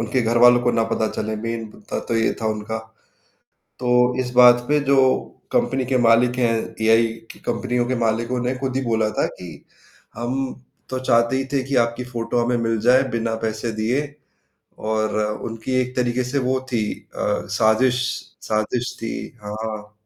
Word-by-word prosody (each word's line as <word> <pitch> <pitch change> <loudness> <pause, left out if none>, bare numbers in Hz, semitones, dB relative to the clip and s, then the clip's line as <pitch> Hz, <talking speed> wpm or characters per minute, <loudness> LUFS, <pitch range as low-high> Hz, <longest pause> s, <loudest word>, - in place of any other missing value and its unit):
उनके 115 +3 0
घरवालों 120 +2 +5
को 120 - +3
ना 115 - +2
पता 110 - +1
चले। 110 0 -2
मेन 115 +1 -4
मुद्दा 105 - -6
तो 115 - +1
ये 115 - +2
था 110 - -1
उनका। 110 +1 -2 1.0
तो 125 -1 -1 0.3
इस 125 -1 -4
बात 120 -1 +7
पे 150 0 +4
जो 140 - +5 0.5
कंपनी 130 +1 +1
के 130 +1 +1
मालिक 120 +1 +4
हैं 120 -2 +3 0.3
एआई 115 +1 +5 0.2
की - - -17
कंपनियों 125 -1 0
के 130 - 0
मालिकों 115 +2 0
ने 125 +1 -1
खुद 130 0 -3
ही - - 0
बोला 110 -2 +1
था - - +3
कि 90 -1 -8 0.7
हम 120 +3 -3 0.5
तो 130 0 -2
चाहते 115 0 +2
ही 135 - -1
थे 135 -2 +1
कि 140 - 0
आपकी 115 +2 -5
फ़ोटो 120 -1 -2
हमें 120 0 +1
मिल 115 -1 0
जाए 125 +3 +5
बिना 115 -1 -1
पैसे 110 +1 -2
दिए 115 +6 0 0.9
और 110 0 0 0.4
उनकी 115 +3 -5
एक 125 0 -3
तरीके 125 0 0
से 130 +3 -1
वो 130 0 +1
थी 115 -2 +1 0.3
अ, - - -6 0.3
साज़िश 110 +5 +3 0.5
साज़िश 110 +3 -1
थी। 115 - -3 0.3
हाँ। 105 0 -5
115 Hz, 175 wpm, -22 LUFS, 110-125 Hz, 1.0 s, बात